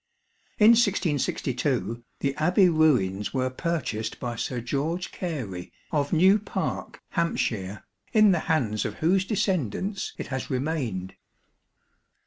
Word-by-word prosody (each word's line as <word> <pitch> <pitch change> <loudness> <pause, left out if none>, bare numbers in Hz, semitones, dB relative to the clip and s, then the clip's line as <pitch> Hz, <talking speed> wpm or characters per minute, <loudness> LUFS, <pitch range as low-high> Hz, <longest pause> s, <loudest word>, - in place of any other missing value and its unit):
In 215 +2 +8
1662, 145 - +1 0.2
the 140 -1 0
Abbey 180 +4 +4
ruins 125 - +2
were 130 0 0
purchased 130 -8 -3
by 120 -2 -3
Sir 125 +1 -3
George 150 +9 -2
Gary 120 - -5 0.2
of 145 -2 0
New 190 +5 +5
Parke, 210 - -4
Hants, 170 -6 0 0.6
in 215 -2 +6
the 175 - +2
hands 115 -10 +1
of - - -4
whose 185 +4 +2
descendants 190 - -1
it - - -6
has 135 - -3
remained. 130 - -2
150 Hz, 115 wpm, -26 LUFS, 120-180 Hz, 0.6 s, In